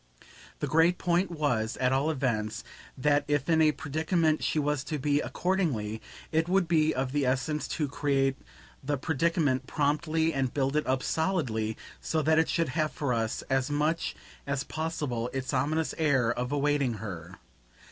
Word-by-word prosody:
The -, -, +1 dB
great 165 Hz, +3 st, +4 dB
point 175 Hz, +1 st, +1 dB
was, 135 Hz, -9 st, -1 dB
at 130 Hz, 0 st, +2 dB
all 140 Hz, +4 st, +2 dB
events, 120 Hz, -8 st, -1 dB, 0.3 s
that 145 Hz, +2 st, +3 dB
if 145 Hz, -2 st, 0 dB
in 160 Hz, -1 st, +4 dB
a 155 Hz, -1 st, +5 dB
predicament 155 Hz, +2 st, 0 dB
she -, -, 0 dB
was 145 Hz, -2 st, 0 dB
to 150 Hz, -, -2 dB
be, 145 Hz, +1 st, +1 dB
accordingly, 140 Hz, -, -1 dB, 0.3 s
it 160 Hz, +1 st, +1 dB
would 190 Hz, -1 st, +3 dB
be 155 Hz, -2 st, +3 dB
of 130 Hz, -2 st, -2 dB
the 145 Hz, 0 st, +1 dB
essence 135 Hz, +4 st, 0 dB
to 150 Hz, -, -1 dB
create 135 Hz, -1 st, +1 dB, 0.5 s
the 145 Hz, +1 st, -1 dB
predicament 145 Hz, -2 st, 0 dB
promptly 160 Hz, +2 st, +1 dB
and 135 Hz, -2 st, 0 dB
build 135 Hz, 0 st, 0 dB
it 150 Hz, -, +1 dB
up 130 Hz, 0 st, +1 dB
solidly, 125 Hz, -, -1 dB, 0.2 s
so 160 Hz, -1 st, -1 dB
that 160 Hz, +1 st, +4 dB
it 160 Hz, -, +2 dB
should 165 Hz, -4 st, +1 dB
have 155 Hz, +3 st, 0 dB
for 140 Hz, -4 st, -1 dB
us 115 Hz, -1 st, -1 dB
as 135 Hz, +1 st, 0 dB
much 150 Hz, +3 st, 0 dB, 0.3 s
as 140 Hz, 0 st, -1 dB
possible 150 Hz, -8 st, -3 dB
its 135 Hz, +1 st, -3 dB
ominous 150 Hz, +5 st, 0 dB
air 135 Hz, -7 st, +3 dB
of 125 Hz, +2 st, -3 dB
awaiting 145 Hz, -4 st, +1 dB
her. 90 Hz, -4 st, -7 dB
145 Hz, 165 wpm, -29 LUFS, 130-160 Hz, 0.5 s, a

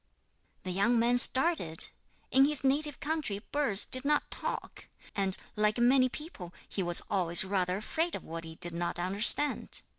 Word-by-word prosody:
The 185 Hz, -, -6 dB
young 200 Hz, +6 st, 0 dB
man 240 Hz, +2 st, +2 dB
started. 260 Hz, -, +3 dB, 0.4 s
In 270 Hz, +1 st, +4 dB
his 295 Hz, -1 st, -2 dB
native 290 Hz, +1 st, +3 dB
country 300 Hz, -9 st, -4 dB
birds 255 Hz, -9 st, 0 dB
did 255 Hz, 0 st, +2 dB
not 295 Hz, +1 st, -1 dB
talk, -, -, -7 dB, 0.3 s
and, 195 Hz, -2 st, 0 dB, 0.2 s
like 210 Hz, +1 st, 0 dB
many 255 Hz, +2 st, +2 dB
people, 240 Hz, -, -10 dB
he 195 Hz, -, -5 dB
was 175 Hz, -1 st, +5 dB
always 175 Hz, -3 st, +4 dB
rather 185 Hz, -1 st, -2 dB
afraid 325 Hz, -, -3 dB
of -, -, -8 dB
what 165 Hz, +1 st, -8 dB
he 160 Hz, 0 st, -11 dB
did 170 Hz, +1 st, -1 dB
not 170 Hz, +1 st, -4 dB
understand. 200 Hz, +11 st, 0 dB
215 Hz, 160 wpm, -29 LUFS, 180-275 Hz, 0.4 s, was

